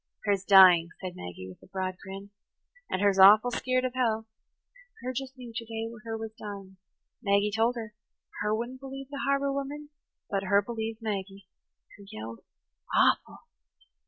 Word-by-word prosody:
"Her's 200 -2 +1
dying," 185 -4 +8
said 185 -2 -6
Maggie 90 +1 -8
with 95 - -13
a - - -17
broad 185 -1 -3
grin. 195 +1 -9 0.6
"And 185 - -1
her's 200 -1 +3
awful 210 +5 +8
skeered 255 +1 0
of 255 - -2
hell. 225 -4 0 0.8
Her 255 +1 -3
just 265 +1 -5
knew 245 -2 -10
ter 230 - -4
day 225 0 -5
her 225 -1 -3
was 220 0 -6
dying. 200 -3 -9 0.4
Maggie 200 -1 +2
told 230 +2 +2
her–her 210 -1 -5
wouldn't 240 +3 -5
believe 270 0 -8
the 280 - -4
harbour 275 0 +1
women, 285 +2 -5 0.4
but 195 -1 -1
her 200 +1 +3
believed 225 0 -5
Maggie. 195 -2 -4 0.5
Her - - -12
yelled 110 +1 -7 0.6
awful." - - +2
215 Hz, 160 wpm, -28 LUFS, 195-245 Hz, 0.8 s, dying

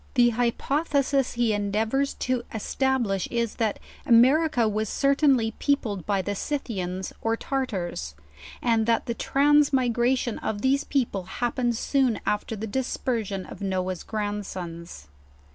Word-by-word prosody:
The 240 -1 +5
hypothesis 275 +3 0
he 235 -2 +1
endeavors 220 +7 0
to 255 -1 -1
establish, 225 -3 0
is, 235 -2 -2
that 220 -3 0 0.3
America 250 +1 +4
was 215 0 -1
certainly 275 -5 +3
peopled 220 - 0
by 200 -2 +1
the 205 - -2
Scythians 190 -7 -3
or 225 0 0
Tar 270 +1 -1
tars, 175 - -4 0.5
and 230 -2 +2
that 230 -1 +2
the 235 - -2
transmigration 260 -4 +2
of 205 -1 -3
these 275 +2 +3
people 230 -9 -1
happened 240 +2 -1
soon 260 -3 +1
after 210 +2 -1
the 215 +1 -5
dispersion 220 -4 -2
of - - -11
Noah's 185 -2 -2
grandsons. 185 - -5
230 Hz, 125 wpm, -26 LUFS, 205-265 Hz, 0.5 s, The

